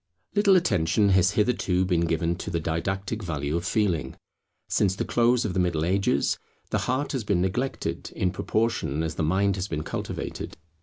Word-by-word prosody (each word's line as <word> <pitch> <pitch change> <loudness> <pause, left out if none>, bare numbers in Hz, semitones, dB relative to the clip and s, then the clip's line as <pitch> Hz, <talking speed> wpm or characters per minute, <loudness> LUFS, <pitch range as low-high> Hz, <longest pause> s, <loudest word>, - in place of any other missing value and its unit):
Little 200 -2 +5
attention 100 - +3
has 95 0 +4
hitherto 100 -4 +1
been 85 -2 +1
given 85 +1 0
to 100 - -5
the 85 -2 -1
didactic 95 +7 -2
value 75 -5 -2
of 85 - -1
Feeling. 90 -5 0 0.5
Since 95 -2 +2
the - - -2
close 120 0 +2
of 100 - -2
the 95 - 0
Middle 85 -3 +1
Ages, 95 -6 +1 0.3
the - - +1
heart 130 +4 0
has 130 -5 -2
been 100 -3 +1
neglected 105 +9 -2
in 90 - +1
proportion 100 -5 -1
as 80 -1 -2
the - - -3
mind 95 +5 +2
has 95 +1 -2
been 75 -4 -3
cultivated. - - -5
95 Hz, 175 wpm, -26 LUFS, 85-105 Hz, 0.5 s, Little